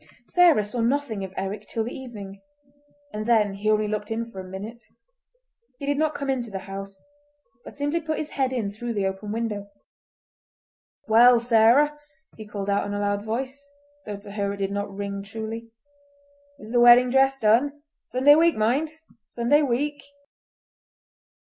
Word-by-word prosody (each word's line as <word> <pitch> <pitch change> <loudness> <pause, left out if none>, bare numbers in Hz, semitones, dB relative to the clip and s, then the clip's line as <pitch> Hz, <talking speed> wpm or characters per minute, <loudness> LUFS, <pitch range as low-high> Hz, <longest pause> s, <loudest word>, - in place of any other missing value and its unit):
Sarah 345 -11 +4
saw 210 +4 -4
nothing 235 -4 -1
of 190 - -6
Eric 195 +2 -4
till 225 - -2
the 235 - -5
evening, 205 -7 -9 0.7
and 215 +1 -4
then 215 -4 +3
he 205 +2 -2
only 215 0 +2
looked 210 0 -3
in 230 +1 -3
for 190 - -9
a - - -6
minute. 200 +6 -8 1.0
He 280 - -6
did 285 0 0
not 310 -1 +1
come 280 - -4
into 255 -4 -1
the 195 - -5
house, 195 0 -8 0.7
but - - -12
simply 290 +4 -1
put 315 -1 -3
his 310 - -5
head 265 -2 0
in 225 -6 -2
through 235 +3 -5
the 200 -1 0
open 195 +2 -4
window. 215 -3 -3 1.4
"Well, 235 +2 +7
Sarah," 240 +6 +4 0.4
he 215 -1 -10
called 200 -1 -5
out 200 0 0
in 205 - -4
a - - -2
loud 205 0 -1
voice, 260 +5 -4 0.4
though 205 -1 -4
to 200 0 -12
her 200 -1 -2
it - - -7
did 195 0 -2
not 200 0 -3
ring 200 0 -5
truly, 225 +3 -7 0.9
"is 220 -4 -11
the 240 - +3
wedding 240 +1 +7
dress 270 +1 +3
done? 270 +6 +2 0.2
Sunday 265 +3 +5
week, 330 +2 +4
mind! 245 +9 +1 0.4
Sunday 245 +6 +2
week!" 290 +2 -1
225 Hz, 170 wpm, -24 LUFS, 205-265 Hz, 1.4 s, Well